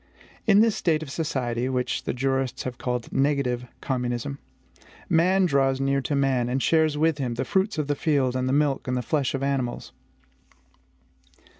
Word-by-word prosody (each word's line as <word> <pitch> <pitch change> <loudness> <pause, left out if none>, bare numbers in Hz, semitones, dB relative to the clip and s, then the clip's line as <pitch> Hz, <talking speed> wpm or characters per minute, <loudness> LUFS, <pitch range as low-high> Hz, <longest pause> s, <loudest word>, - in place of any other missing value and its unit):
In 210 -1 +6
this 225 -2 +3
state 160 -2 +1
of 140 - -8
society, 130 -6 -2
which 125 -1 -2
the - - 0
jurists 135 0 -1
have 125 -1 -6
called 125 -1 -3
NEGATIVE 135 -3 0
COMMUNISM 125 +1 -2 0.7
man 185 +3 +3
draws 135 -4 +2
near 140 0 +1
to 145 - -2
man, 130 -3 +1
and 130 +2 0
shares 155 +1 +2
with 155 -1 +2
him 125 -3 -2
the 130 +3 -2
fruits 195 -1 0
of 150 - 0
the 145 - 0
field 140 -4 +1
and 130 0 0
the - - +1
milk 145 -1 +1
and 125 -1 -1
flesh 145 -3 0
of 135 - -3
animals. 135 -3 -2
135 Hz, 170 wpm, -25 LUFS, 125-150 Hz, 0.7 s, In